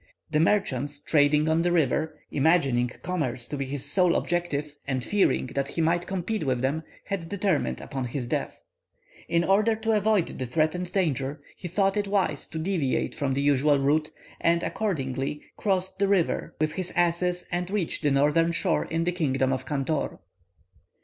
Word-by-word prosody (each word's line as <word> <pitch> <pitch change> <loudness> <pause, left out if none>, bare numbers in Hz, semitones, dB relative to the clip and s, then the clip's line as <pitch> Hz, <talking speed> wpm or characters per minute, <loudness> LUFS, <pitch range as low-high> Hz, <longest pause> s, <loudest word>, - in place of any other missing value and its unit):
The 150 - +2
merchants 145 -6 +1
trading 150 0 +3
on 160 +1 +3
the 175 +1 +1
river, 155 -1 +1
imagining 135 -5 +3
commerce 135 -9 -1
to 145 - -4
be 140 -1 -2
his 140 0 -4
sole 180 -3 +3
object, 175 -3 0 0.3
and 130 -2 -1
fearing 205 -4 +2
that 140 0 -1
he 155 - -6
might 170 +2 +1
compete 190 +2 -2
with 130 -4 0
them, 140 +5 0 0.2
had 190 -5 -4
determined 195 -5 0
upon 135 -3 -4
his 125 +1 -3
death. 120 - -3 0.7
"In 170 0 +2
order 210 +5 +3
to 225 +1 -1
avoid 210 -3 +1
the 130 - -2
threatened 165 +6 0
danger, 150 -6 0 0.2
he 180 - -7
thought 195 +3 +1
it 205 -1 0
wise 190 -8 0
to - - -7
deviate 160 -5 0
from 135 -3 -1
the 140 - 0
usual 145 +1 +3
route, 150 +3 +1 0.3
and, 170 0 +2
accordingly, 140 - -2
crossed 190 -1 -1
the 200 - +3
river 195 -4 +1
with 155 0 +1
his 185 +2 -3
asses, 175 +1 +1
and 175 0 -2
reached 200 -4 -1
the 145 - +2
northern 150 +4 +3
shore 165 +1 0
in 165 +1 -1
the 175 - +1
kingdom 135 -6 +1
of 130 - -4
Cantor." 145 +1 -1
160 Hz, 175 wpm, -26 LUFS, 140-180 Hz, 0.7 s, trading